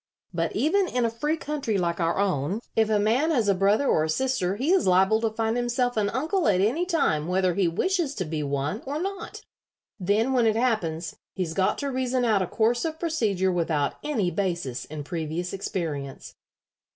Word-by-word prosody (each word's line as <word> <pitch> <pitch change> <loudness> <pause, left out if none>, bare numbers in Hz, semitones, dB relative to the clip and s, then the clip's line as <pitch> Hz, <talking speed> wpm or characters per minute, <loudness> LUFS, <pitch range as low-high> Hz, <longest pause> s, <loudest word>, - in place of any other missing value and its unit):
But - - -1
even 370 +6 +2
in 250 -6 0
a 230 - 0
free 295 +7 -1
country 285 -9 -2
like 170 -2 -1
our 165 0 +1
own, 190 -1 0 0.2
if 220 -1 +3
a 215 - +3
man 230 +10 +2
has 245 -10 +2
a 200 - +5
brother 200 +7 +2
or 155 - +3
a - - -4
sister 195 -1 0
he 265 +10 0
is 380 - +3
liable 190 +4 +4
to 225 - +1
find 225 +1 -1
himself 245 0 0
an 210 -2 +1
uncle 315 - 0
at 190 -3 +3
any 260 - +1
time 170 - +1
whether 185 0 +1
he 185 0 +2
wishes 320 - 0
to 185 - -2
be 155 -1 -3
one 140 +7 -2
or 290 +2 -2
not. 390 +3 -5 0.6
Then 210 +7 +1
when 240 -3 +3
it 215 - +2
happens 185 -9 -1 0.2
he's 180 -4 -2
got 190 +2 +1
to 280 -1 -3
reason 255 -1 0
out 215 -4 +3
a 185 - -1
course 230 +5 +1
of 320 -1 -3
procedure 215 - 0
without 160 -5 0
any 220 -12 0
basis 170 -11 -2
in 150 -1 -7
previous 165 +2 -4
experience." 155 -8 -4
210 Hz, 200 wpm, -26 LUFS, 175-260 Hz, 0.6 s, a